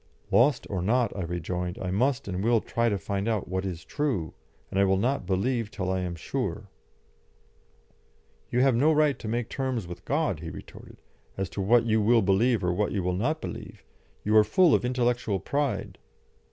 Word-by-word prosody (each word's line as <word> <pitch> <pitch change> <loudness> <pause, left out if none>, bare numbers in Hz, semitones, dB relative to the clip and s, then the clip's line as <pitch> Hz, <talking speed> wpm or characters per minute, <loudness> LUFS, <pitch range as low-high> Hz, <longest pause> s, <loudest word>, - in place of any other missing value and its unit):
"Lost 135 +5 +4
or 95 -4 -3
not," 115 +4 +1
I 100 - -3
rejoined, 90 +1 -3
"I 90 - -3
must 125 +6 +1
and 95 0 -3
will 115 0 +4
try 115 +2 0
to 100 - 0
find 100 +1 -3
out 110 -4 -1
what 95 +1 -2
is 85 -4 -6
true, 130 - -2 0.4
and 95 - 0
I - - +5
will 95 0 +3
not 120 -1 0
believe 110 +4 0
till 95 -3 -3
I 95 - 0
am 90 -2 -3
sure." 85 - -4 1.8
"You 125 - +1
have 135 -2 +4
no 145 +7 +4
right 150 -2 +2
to 110 - -7
make 115 +1 -1
terms 130 -6 -2
with 85 0 -9
God," - - 0
he - - -6
retorted, - - -12 0.3
"as 95 -1 -3
to 100 - -3
what 115 +4 +4
you 110 -1 +2
will 115 +1 +4
believe 100 +3 +2
or 90 0 +1
what 105 +3 0
you 100 -3 -1
will 90 +1 0
not 140 - -1
believe. - - -8 0.4
You 105 +1 +2
are 105 - +8
full 175 - +4
of - - +3
intellectual 125 -5 0
pride." 145 +5 -2
105 Hz, 195 wpm, -27 LUFS, 95-125 Hz, 1.8 s, are